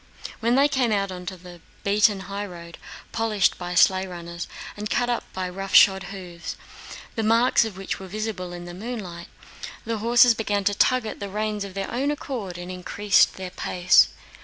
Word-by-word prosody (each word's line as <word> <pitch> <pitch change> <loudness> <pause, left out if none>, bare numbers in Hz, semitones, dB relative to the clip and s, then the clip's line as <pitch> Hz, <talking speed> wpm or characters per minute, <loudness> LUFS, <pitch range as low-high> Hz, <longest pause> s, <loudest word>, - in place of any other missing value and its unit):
When 235 +2 +2
they 280 +2 +5
came 260 -5 +1
out 200 -2 0
onto 180 +1 -6
the 175 -1 -13 0.2
beaten 205 0 +3
highroad—polished 195 +2 -3
by 180 0 -4
sleigh 190 +2 +4
runners 170 -1 -7 0.3
and 210 0 -5
cut 245 0 +1
up 240 - -3
by 185 -1 -3
rough 195 +2 -4
shod 195 -1 +7
hoofs, 180 -3 -7 0.6
the 225 - -2
marks 230 +2 +4
of 210 -4 -7
which 195 - -4
were 190 - -8
visible 205 -2 -4
in 175 0 -8
the 175 - -8
moonlight—the 210 +1 -7
horses 240 +2 +6
began 205 -3 -1
to 205 - +2
tug 255 +3 +2
at 215 - -6
the 200 -1 -5
reins 210 0 -2
of 195 -1 -9
their 195 -1 -3
own 270 +4 0
accord 245 -11 -4
and 175 +1 -7
increased 190 +2 +2
their 185 -1 -6
pace. 180 0 +4
200 Hz, 175 wpm, -24 LUFS, 180-220 Hz, 0.6 s, shod